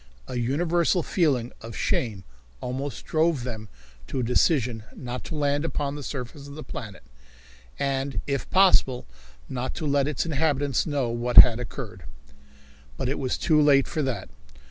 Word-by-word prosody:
A 125 - -4
universal 170 +7 +1
feeling 135 -11 +1
of 115 +1 -8
shame 105 -6 -1 0.4
almost 130 +2 -5
drove 160 -4 +1
them 110 -4 -6 0.4
to - - -3
a - - 0
decision 125 -1 +2
not 125 0 -6
to 160 - -5
land 145 0 +1
upon 145 -3 -2
the 145 - -6
surface 140 +1 -6
of 140 - -10
the 155 - -7
planet, 110 -6 -8 0.7
and 135 0 -1
if 140 -2 -2
possible 185 -9 +4 0.4
not 130 0 -4
to 160 - -4
let 140 -1 +2
its 150 - -1
inhabitants 145 -4 0
know 140 -5 0
what 120 +1 -2
had 120 -1 +10
occurred. 110 - -7 0.9
But - - -1
it 140 - -2
was 130 -2 -1
too 155 -2 +3
late 140 -2 +5
for 155 - -2
that. 125 -9 -2
135 Hz, 160 wpm, -26 LUFS, 125-150 Hz, 0.9 s, had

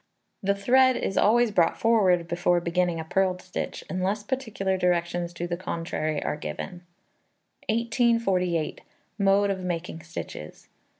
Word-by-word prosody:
The 200 -1 +1
thread 255 +6 +4
is 195 - -2
always 235 +1 +4
brought 170 -4 +2
forward 190 -7 +3
before 175 0 +2
beginning 175 0 0
a - - -3
purled 185 +2 0
stitch, 185 0 -5
unless 190 +3 -1
particular 215 -6 -2
directions 175 -1 0
to 170 0 -4
the 175 0 -2
contrary 165 -4 -3
are - - -2
given. 175 +3 -6 0.9
1848. 220 - +1 0.4
Mode 200 0 +3
of 190 - -3
making 175 -2 -4
Stitches. 75 - -8
185 Hz, 130 wpm, -26 LUFS, 175-205 Hz, 0.9 s, thread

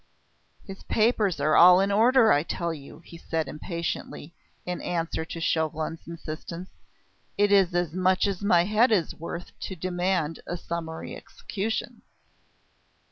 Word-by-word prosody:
"His 195 -2 -9
papers 215 -5 +1
are 155 +1 +2
all 180 +1 +8
in 195 +1 +1
order, 230 +2 +5
I 145 - +4
tell 170 +1 -3
you," 145 +1 -11
he 170 - -12
said 160 -3 -2
impatiently, 165 +1 -5 0.3
in 180 0 -4
answer 165 -2 -2
to 165 - -7
Chauvelin's 160 0 -2
insistence. 170 +2 -7 0.7
"It 205 0 +3
is 190 -3 +4
as 175 -3 0
much 185 +1 +2
as 195 -2 -2
my 180 -4 +4
head 215 +6 +3
is 185 -7 +1
worth 170 +1 -7
to 190 - -5
demand 175 -2 -1
a 175 - -3
summary 165 -1 -6
execution." 220 +3 -5
175 Hz, 140 wpm, -26 LUFS, 165-195 Hz, 0.7 s, all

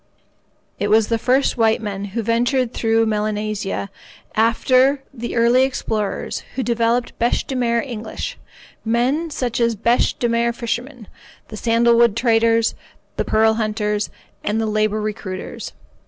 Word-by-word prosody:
It 205 - 0
was 215 +1 +3
the 230 -1 +1
first 260 +3 +2
white 225 -1 +3
men 200 -2 -4
who 215 +4 -4
ventured 240 +2 +1
through 225 0 +2
Melanesia 210 -2 -2 0.4
after 255 +5 +3
the 240 -2 -5
early 235 +2 +4
explorers, 220 -6 -2
who 260 - -1
developed 235 0 0
bêche 235 +1 +1
de 265 - -4
mer 235 -2 +1
English—men 240 +4 -3
such 250 -6 -2
as 235 -1 +2
the 205 - -22
bêche 235 +1 +2
de 240 - 0
mer 235 0 +1
fishermen, 240 0 -4 0.4
the 215 - -7
sandalwood 235 0 +3
traders, 230 -1 +3 0.4
the - - +1
pearl 220 0 +3
hunters, 210 -1 -1 0.3
and 210 +2 0
the 225 - 0
labour 215 0 0
recruiters. 190 -3 -5
230 Hz, 140 wpm, -20 LUFS, 215-240 Hz, 0.4 s, early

